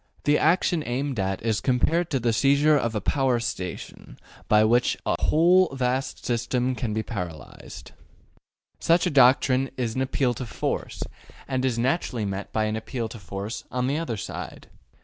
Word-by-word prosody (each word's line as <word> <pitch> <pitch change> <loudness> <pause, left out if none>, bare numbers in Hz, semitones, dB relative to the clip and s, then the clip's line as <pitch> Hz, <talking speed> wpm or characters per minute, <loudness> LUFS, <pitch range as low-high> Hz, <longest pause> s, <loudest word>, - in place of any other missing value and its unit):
The 150 0 +3
action 170 +1 +2
aimed 130 0 -2
at 95 +1 -2
is 110 -2 0
compared 160 +7 +1
to 135 - 0
the 115 -1 +1
seizure 140 +5 +4
of 115 -5 0
a 105 - -1
power 130 +1 +1
station, 90 -6 -6 0.3
by 105 0 +5
which 120 +3 +2
a - - -1
whole 180 +3 +4
vast 130 +1 -2
system 125 +2 0
can 120 -3 -3
be 110 +1 -1
paralyzed. 90 -9 -8 0.9
Such 170 +2 +3
a 180 - 0
doctrine 130 0 +4
is 120 -3 -1
an 130 - -2
appeal 130 -1 0
to 125 - -6
force, 105 - -3 0.4
and 130 -1 -1
is 130 -3 0
naturally 125 -3 0
met 100 0 -5
by 110 - 0
an 110 0 -1
appeal 115 +1 -4
to 115 - -9
force 100 +4 -6
on 125 0 -1
the 140 +4 0
other 140 -10 -3
side. - - -7
125 Hz, 170 wpm, -25 LUFS, 110-140 Hz, 0.9 s, by